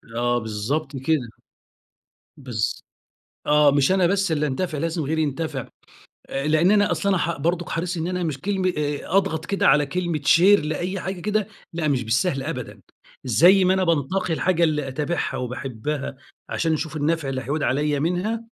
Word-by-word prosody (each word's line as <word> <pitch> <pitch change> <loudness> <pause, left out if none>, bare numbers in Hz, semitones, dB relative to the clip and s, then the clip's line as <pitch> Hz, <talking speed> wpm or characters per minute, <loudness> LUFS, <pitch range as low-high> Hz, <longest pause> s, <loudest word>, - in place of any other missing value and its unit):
آه 120 +1 +1
بالضبط 120 +7 -3
كده. 135 -2 0 1.1
بالض 125 -6 -5 0.8
آه. 150 -1 +5
مش 140 +3 +3
أنا 190 -2 +3
بس 195 -1 +1
اللي 150 -1 +1
أنتَفع 155 +3 -2
لازم 165 +2 -2
غيري 160 +2 0
ينتَفع. 145 -2 -3 0.6
أ 135 +2 -2
لإن 155 +5 +4
أنا 205 -1 +3
أصلًا 200 -1 +1
ح 170 -1 -1
برضُك 170 +4 -1
حريص 175 +2 -2
إن 165 +1 -2
أنا 180 0 -2
مش 155 -5 -3
كلمة 190 -1 0
أ 145 -1 -1 0.2
أضغط 160 -4 0
كده 200 +1 +1
على 150 +1 +5
كلمة 170 +1 -2
شير 185 +7 +6
لأي 175 +5 -2
حاجة 190 +1 -4
كده، 210 +1 0 0.3
لأ 165 -2 -1
مش 130 -4 +1
بالسهل 135 +5 0
أبدًا. 125 -9 -6 0.4
زي 175 - +5
ما 185 - +4
أنا 190 0 +1
بانتقي 170 +2 0
الحاجة 170 +1 +1
اللي 150 -4 +1
أتابعها 150 +6 -2
وباحبها 135 +3 -4 0.3
عشان 165 -1 0
أشوف 160 0 -3
النَفع 155 -1 0
اللي 130 -1 -3
هيعود 145 +5 -2
عليّا 145 +3 +1
منها، 185 +8 -1
155 Hz, 170 wpm, -23 LUFS, 140-180 Hz, 1.1 s, شير